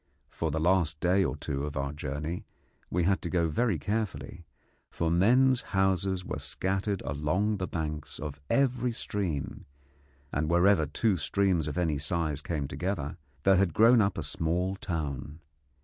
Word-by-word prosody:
For 80 - -2
the 80 +1 -1
last 80 -3 +2
day 90 +4 +3
or 80 - -1
two 70 -2 -3
of 75 -1 -4
our 70 +1 -2
journey 75 +6 -4 0.5
we 90 0 +1
had 95 +2 +2
to 85 - -4
go 85 -2 +2
very 110 +3 +1
carefully, 95 -1 -3 0.4
for 80 -1 -1
men's 125 +9 +4 0.2
houses 95 -1 +1
were - - -4
scattered 95 +1 -2
along 80 +10 0
the 95 -1 -3
banks 75 -2 -4
of 75 -1 -6
every 125 -3 +2
stream, 85 - -3 0.6
and 75 +2 -1
wherever 85 -1 +4
two 100 +6 +1
streams 90 -1 +1
of 75 - -4
any 80 -5 +1
size 75 -1 -1
came 75 -3 -2
together 85 -2 -3 0.3
there 95 -1 +5
had 95 -4 +2
grown 115 +1 +6
up 100 -2 +1
a 80 - -2
small 85 +5 -1
town. 75 -5 -4
85 Hz, 160 wpm, -29 LUFS, 75-95 Hz, 0.6 s, grown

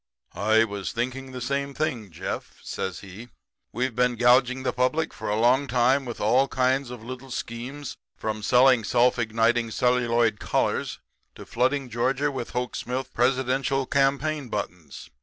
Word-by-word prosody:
"'I 110 +2 +3
was 100 -3 -4
thinking 130 +3 -3
the 130 - -6
same 140 +2 -2
thing, 125 -9 -2
Jeff,' 80 - -6
says 95 -3 -4
he. 100 +5 -11 0.4
'We've 125 -1 -2
been 125 0 +2
gouging 125 +2 +3
the - - -1
public 130 +6 0
for - - -5
a 105 +1 0
long 130 +4 +3
time 130 +2 +2
with 120 -2 -6
all 125 +6 +3
kinds 130 0 +1
of 120 -3 -9
little 130 +2 -8
schemes 125 +4 -6 0.2
from 110 -1 -3
selling 125 +2 +5
self 125 +3 +3
igniting 115 +1 +1
celluloid 120 -3 +2
collars - - -1 0.4
to - - -10
flooding 130 +3 0
Georgia 130 +5 0
with 130 -4 -5
Hoke 125 0 -3
Smith 130 +1 -4
presidential 130 +2 +1
campaign 140 +1 0
buttons. 75 - -6
125 Hz, 155 wpm, -25 LUFS, 115-135 Hz, 0.4 s, selling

